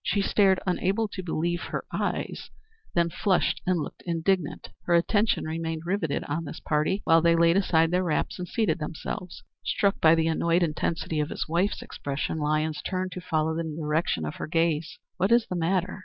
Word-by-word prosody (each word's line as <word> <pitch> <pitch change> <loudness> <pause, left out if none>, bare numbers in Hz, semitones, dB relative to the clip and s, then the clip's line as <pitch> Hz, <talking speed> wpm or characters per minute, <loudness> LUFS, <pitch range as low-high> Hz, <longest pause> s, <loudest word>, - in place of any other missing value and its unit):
She 200 - +1
stared 195 -2 +3
unable 195 +4 +1
to 195 - -5
believe 175 0 -1
her - - -4
eyes, - - -3 0.5
then 170 -1 +2
flushed 190 0 +1
and 180 -2 +2
looked 150 - -6
indignant. 170 -1 -1 0.2
Her 175 - +3
attention 205 +6 +2
remained 160 0 -3
rivetted 175 -5 -1
on 165 +3 -3
this 145 - -7
party 155 +6 0
while 165 0 +5
they 170 0 +4
laid 165 0 +4
aside 165 -4 +3
their 180 +1 +2
wraps 165 +1 -1
and 180 - -4
seated 205 -8 0
themselves. 160 +3 -6 0.2
Struck 200 -1 +1
by 160 0 +7
the 165 -1 +1
annoyed 170 +2 +2
intensity 160 0 -1
of 150 +1 0
his - - -3
wife's 175 +5 0
expression, 145 +3 -4
Lyons 155 +1 0
turned 185 -1 -2
to 180 - -6
follow 160 -2 0
the 165 +1 -2
direction 155 - -1
of 75 - -5
her - - -4
gaze. 165 -1 0 0.2
"What 190 +4 +1
is 235 -1 +5
the 180 - -4
matter?" 180 +2 0
170 Hz, 185 wpm, -27 LUFS, 160-185 Hz, 0.5 s, by